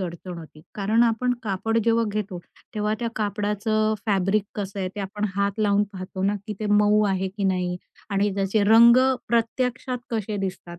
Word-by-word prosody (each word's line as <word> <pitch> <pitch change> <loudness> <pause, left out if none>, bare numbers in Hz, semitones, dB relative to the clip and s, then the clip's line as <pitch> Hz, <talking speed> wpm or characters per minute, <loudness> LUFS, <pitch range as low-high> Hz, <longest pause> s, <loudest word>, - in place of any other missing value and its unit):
अडचण 175 0 -6
होती, 155 -2 -12
कारण 215 +3 +2
आपण 240 +2 +2
कापड 225 +2 -1
जेव्हा 230 0 +3
घेतो 205 -3 -3 0.4
तेव्हा 210 0 0
त्या 235 - -1
कापडाचं 210 +1 0
फॅब्रिक 195 0 +1
कसं 200 -1 -5
आहे 185 - -1
ते - - -3
आपण 205 +2 -4
हात 200 0 +1
लावून 205 -1 +3
पाहतो 185 0 -6
ना, 200 +2 +1
की 210 - -4
ते 215 - -2
मऊ 210 +1 +4
आहे 190 -1 0
की 200 +1 -5
नाही? 180 -2 0 0.3
आणि 200 +1 +1
त्याचे 200 +2 +1
रंग 230 +3 +7 0.3
प्रत्यक्षात 250 +2 -1
कसे 215 -2 -2
दिसतात. 185 -3 -5
205 Hz, 175 wpm, -24 LUFS, 195-220 Hz, 0.4 s, रंग